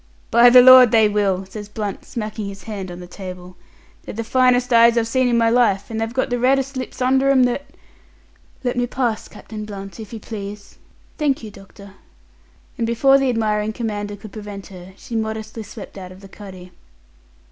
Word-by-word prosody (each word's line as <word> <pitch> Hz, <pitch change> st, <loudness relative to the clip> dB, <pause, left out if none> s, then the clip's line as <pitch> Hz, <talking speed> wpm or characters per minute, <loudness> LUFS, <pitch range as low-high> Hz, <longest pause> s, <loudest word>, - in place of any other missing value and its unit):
"By 235 Hz, +1 st, +7 dB
the 250 Hz, 0 st, +8 dB
Lord, 255 Hz, -1 st, +9 dB
they 220 Hz, -1 st, +4 dB
will!" 200 Hz, -2 st, 0 dB
says 205 Hz, +2 st, -9 dB
Blunt, 210 Hz, -2 st, -5 dB
smacking 215 Hz, -2 st, -5 dB
his 195 Hz, -1 st, -9 dB
hand 200 Hz, -4 st, -6 dB
on 175 Hz, 0 st, -8 dB
the -, -, -9 dB
table. 180 Hz, -1 st, -10 dB, 0.5 s
"They're -, -, -9 dB
the 230 Hz, -, -3 dB
finest 250 Hz, +1 st, +2 dB
eyes 235 Hz, 0 st, +6 dB
I've 225 Hz, -1 st, +1 dB
seen 255 Hz, +2 st, +1 dB
in 240 Hz, -1 st, +2 dB
my 230 Hz, -1 st, +3 dB
life, 225 Hz, -4 st, +2 dB
and 220 Hz, 0 st, -3 dB
they've 225 Hz, 0 st, -2 dB
got 260 Hz, +1 st, -2 dB
the 245 Hz, -, 0 dB
reddest 270 Hz, +2 st, +1 dB
lips 255 Hz, 0 st, -5 dB
under 265 Hz, +2 st, +2 dB
'm 265 Hz, -2 st, +5 dB
that 250 Hz, +3 st, -1 dB, 0.5 s
" -, -, -33 dB
"Let 245 Hz, 0 st, -2 dB
me 245 Hz, 0 st, 0 dB
pass, 240 Hz, -4 st, -2 dB
Captain 215 Hz, -1 st, -9 dB
Blunt, 195 Hz, 0 st, -9 dB
if 215 Hz, -2 st, -9 dB
you 225 Hz, -, -7 dB
please. 205 Hz, -1 st, -9 dB, 0.4 s
Thank 280 Hz, -5 st, 0 dB
you, 215 Hz, -, -8 dB
doctor." 195 Hz, 0 st, -15 dB, 0.9 s
And 230 Hz, -, 0 dB
before 270 Hz, +4 st, +4 dB
the 270 Hz, -1 st, +1 dB
admiring 215 Hz, -2 st, -1 dB
commander 205 Hz, -3 st, -4 dB
could 210 Hz, 0 st, -12 dB
prevent 205 Hz, -2 st, -8 dB
her, 180 Hz, +1 st, -12 dB
she 235 Hz, -, -8 dB
modestly 220 Hz, 0 st, -4 dB
swept 215 Hz, -1 st, -10 dB
out 185 Hz, -1 st, -9 dB
of 185 Hz, +1 st, -14 dB
the 195 Hz, -, -12 dB
cuddy. 185 Hz, -2 st, -12 dB
220 Hz, 200 wpm, -20 LUFS, 200-245 Hz, 0.9 s, Lord